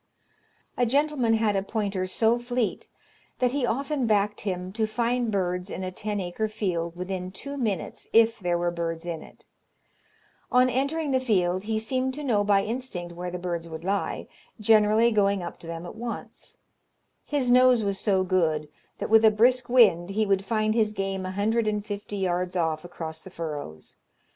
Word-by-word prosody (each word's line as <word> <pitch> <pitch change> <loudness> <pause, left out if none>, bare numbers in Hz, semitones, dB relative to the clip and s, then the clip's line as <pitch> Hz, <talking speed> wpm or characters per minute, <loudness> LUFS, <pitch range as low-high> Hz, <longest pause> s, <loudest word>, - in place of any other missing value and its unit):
A 245 - +3
gentleman 275 -3 +2
had 220 -2 +1
a 195 - +2
pointer 200 -2 -2
so 225 +5 +2
fleet 245 -1 -2 0.5
that 250 -1 +2
he 265 -2 0
often 275 +2 -1
backed 210 -1 +1
him 185 -2 -3
to 220 +2 0
find 240 +1 0
birds 180 -1 -1
in 190 - -5
a 185 - -3
ten 205 +2 -3
acre 185 +4 -2
field 175 -6 -2
within 180 0 -4
two 280 +10 -8
minutes, 215 - -3
if 230 0 +4
there 175 -3 0
were 175 0 0
birds 165 -1 -4
in 165 -2 -4
it. - - -16 1.1
On 250 0 +4
entering 280 +4 -1
the 260 - +3
field, 190 -6 +1
he 220 0 0
seemed 255 +4 -1
to 300 - -6
know 220 -7 +2
by 200 -1 +3
instinct 215 -8 -4
where 180 +1 -5
the 180 - -4
birds 170 -2 -4
would 160 0 -7
lie, 200 +2 -1 0.3
generally 215 +2 +4
going 200 -3 +2
up 170 - -7
to 165 - -12
them 165 +1 -6
at - - -7
once. 235 +1 -7 0.7
His 275 -4 0
nose 250 -2 +6
was 200 -1 -1
so 190 -3 +2
good, 160 -5 +1 0.3
that - - -4
with 225 0 +7
a 220 - +8
brisk 240 +4 +3
wind, 200 -8 +5
he 215 +2 +1
would 195 -1 +1
find 215 0 +1
his 215 -2 +1
game 195 -2 -3
a - - -4
hundred 215 +3 +1
and 210 -1 -1
fifty 205 0 -5
yards 180 -1 -1
off 160 -3 0
across 160 -2 -7
the - - -11
furrows. 150 - -7
205 Hz, 185 wpm, -26 LUFS, 180-235 Hz, 1.1 s, a